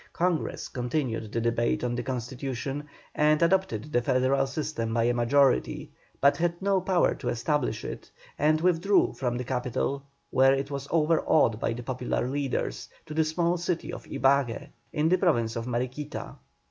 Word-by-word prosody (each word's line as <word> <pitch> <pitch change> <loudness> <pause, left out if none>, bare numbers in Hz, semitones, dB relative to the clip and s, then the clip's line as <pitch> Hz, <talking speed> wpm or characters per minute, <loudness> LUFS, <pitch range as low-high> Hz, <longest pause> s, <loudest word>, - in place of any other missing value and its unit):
Congress 175 -2 -1
continued 120 -4 -2
the 115 - -1
debate 115 +1 0
on 120 -1 0
the 120 - -2
Constitution, 130 +3 -4 0.3
and 150 0 +3
adopted 165 - +1
the 120 - +3
federal 130 +2 +2
system 130 -5 -3
by 115 - +2
a 120 +1 +2
majority, 125 +3 +2 0.3
but 140 +1 +4
had 170 0 0
no 195 -1 +1
power 185 -1 +2
to - - -4
establish 120 -1 -1
it, - - -7 0.3
and 155 +1 +3
withdrew 180 +3 +3
from 125 -2 -2
the 125 - -3
capital, 125 +2 -2 0.3
where 135 +1 +5
it 135 +1 -3
was 140 0 -4
overawed 155 -7 +3
by - - 0
the 120 +1 -6
popular 125 0 -2
leaders, 140 0 -2 0.2
to 155 - -8
the 160 +1 +3
small 170 +2 0
town 175 -1 -2
of - - -8
Ibague, 135 -3 +1 0.2
in 150 +1 +1
the 185 +3 +4
Province 120 - +1
of 115 +1 -4
Mariquita. 125 +4 -4
135 Hz, 165 wpm, -27 LUFS, 120-155 Hz, 0.3 s, where